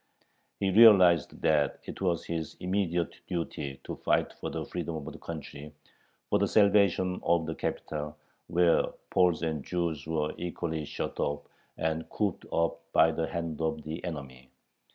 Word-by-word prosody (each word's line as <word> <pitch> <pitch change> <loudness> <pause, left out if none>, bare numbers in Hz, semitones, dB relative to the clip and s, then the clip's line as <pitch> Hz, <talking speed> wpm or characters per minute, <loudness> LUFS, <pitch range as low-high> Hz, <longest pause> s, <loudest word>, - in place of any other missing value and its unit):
He 95 -1 +1
realized 95 -6 +6
that 75 -3 +2
it - - -8
was 85 -3 0
his 80 -2 -4
immediate 90 -2 -1
duty 75 -6 -4
to - - -6
fight - - +1
for - - -6
the - - -4
freedom 85 -2 -4
of 75 -3 -5
the - - -11
country, 75 -2 -8 0.5
for - - +2
the - - +2
salvation 100 -3 +3
of 85 -1 +2
the 80 - -3
capital, 75 -1 -4 0.3
where 85 0 +4 0.3
Poles 90 -3 +3
and 80 -4 -2
Jews 85 -5 -2
were 75 -2 -1
equally 85 -3 -3
shut - - -5
off 75 0 -1 0.3
and 80 0 -2
cooped 100 -5 -2
up 85 0 0
by 80 - +6
the 80 0 -2
hand 85 -2 -4
of 80 -1 -1
the 80 +2 -6
enemy. 70 -6 -7
80 Hz, 155 wpm, -29 LUFS, 75-90 Hz, 0.5 s, realized